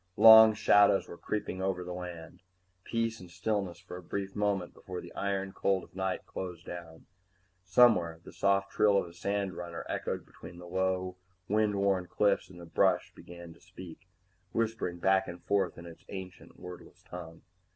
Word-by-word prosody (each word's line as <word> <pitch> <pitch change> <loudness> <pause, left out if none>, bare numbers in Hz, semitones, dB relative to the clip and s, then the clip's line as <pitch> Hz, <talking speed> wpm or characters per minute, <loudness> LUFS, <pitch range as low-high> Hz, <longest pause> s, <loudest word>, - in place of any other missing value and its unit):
Long 110 -1 +10
shadows 100 -1 +4
were - - -9
creeping 100 0 -4
over 95 -1 -1
the 90 0 -6
land, 90 -2 -8 0.4
peace 115 -1 -2
and 90 - -12
stillness 95 0 -2
for 90 - -9
a - - -9
brief 95 +2 -5
moment 100 -4 -1
before 90 -1 -7
the 85 - -11
iron 95 -1 -2
cold 95 -1 0
of - - -17
night 95 -1 -2
closed 90 -2 -7
down. 85 -2 -9 0.6
Somewhere 95 -5 +4
the - - -12
soft 100 +2 +1
trill 100 -1 +4
of - - +1
a 85 - -12
sandrunner 90 -2 -3
echoed - - -3
between 85 - -12
low 90 +1 -2 0.3
wind 105 0 +2
worn 100 -2 +1
cliffs, 100 +4 +1
and 90 -1 -13
the 85 - -9
brush 80 - +1
began 85 -1 -11
to - - -22
speak, 90 0 -12 0.5
whispering 110 -6 -1
back 95 +2 +2
and 85 0 -8
forth 95 0 0
in 85 - -10
its 85 -1 -12
ancient 95 -2 -9
wordless 90 0 -11
tongue. 85 -2 -10
95 Hz, 170 wpm, -30 LUFS, 85-100 Hz, 0.6 s, Long